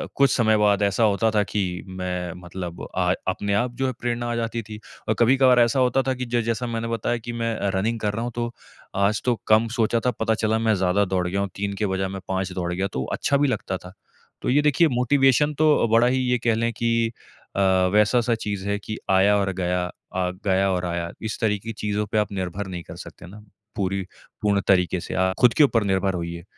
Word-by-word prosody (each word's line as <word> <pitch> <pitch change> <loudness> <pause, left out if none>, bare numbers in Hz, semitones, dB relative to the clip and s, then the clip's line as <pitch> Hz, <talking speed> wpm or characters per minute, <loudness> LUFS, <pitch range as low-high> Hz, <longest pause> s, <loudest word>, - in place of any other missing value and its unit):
कुछ 140 -1 +4
समय 110 -2 +3
बाद 105 -1 +3
ऐसा 100 +3 +1
होता 110 +1 +2
था 105 -1 +2
कि 105 0 -2 0.3
मैं 90 -2 -4
मतलब 90 -1 -7
आ 90 -1 +2 0.2
अपने 100 +2 -2
आप 120 +5 +1
जो 135 - 0
है 130 - -2
प्रेरणा 120 0 -2
आ - - -1
जाती 115 0 -2
थी 105 0 -9 0.3
अ, - - +4
कभी-कभार 130 +1 +5
ऐसा 120 +3 +3
होता 130 +1 +3
था 130 - +2
कि 125 0 -4
जो 120 0 0
जैसा 115 +2 -2
मैंने 115 0 -3
बताया 115 +1 -1
कि 120 +1 -7
मैं 115 -1 -2 0.2
रनिंग 110 +4 0
कर 105 -1 0
रहा 115 +3 -3
हूँ 120 - -3
तो, 120 0 -3 0.4
आज 100 +2 +1
तो 125 -1 +2
कम 110 +1 +4
सोचा 115 0 +2
था, 125 - +3
पता 110 -1 0
चला 110 0 0
मैं 110 -1 +2
ज़्यादा 95 +2 +2
दौड़ 90 -2 -1
गया 100 +3 -1
हूँ, 100 - -2
3 100 0 -3
के 105 - +2
बजाए 95 0 -1
मैं 95 0 -6
5 95 0 -1
दौड़ 90 -1 -2
गया 95 +2 -1
तो 65 - -2
अच्छा 140 - +1
भी 145 +1 +2
लगता 95 -6 -2
था। 90 0 -13 0.5
तो - - -2
ये 140 +4 +4
देखिए 150 +3 +4
मोटिवेशन 135 +2 +3
तो 150 -6 +4
बड़ा 115 +2 +5
ही 130 +1 +1
ये 125 - +3
कह 115 -2 +3
लें 115 +1 0
कि 115 -1 0 0.5
अ, - - +2 0.3
वैसा 105 +4 +4
सा 120 0 +1
चीज़ 100 -2 -3
है 100 0 0
कि 110 +1 -6
आया 100 +2 +4
और 95 -1 0
गया 90 0 0 0.3
अ, 90 -1 0
गया 95 0 +2
और 90 -1 -1
आया। 85 -1 -3
इस 110 0 -4
तरीक़े 105 -1 0
की - - -3
चीज़ों 105 0 0
पे - - +1
आप 105 -1 +1
निर्भर 95 0 -4
नहीं 90 -2 -6
कर - - -10
सकते - - -12
ना, 105 +4 -12 0.3
पूरी 95 -1 -1 0.4
पूर्ण 100 -1 +2
तरीक़े 90 -1 +3
से - - -6
आप 95 0 +1
खुद 125 -2 +5
के 155 - +6
ऊपर 115 -6 +3
निर्भर 95 -1 +1
होइए। 85 -1 -5
105 Hz, 235 wpm, -23 LUFS, 95-115 Hz, 0.5 s, के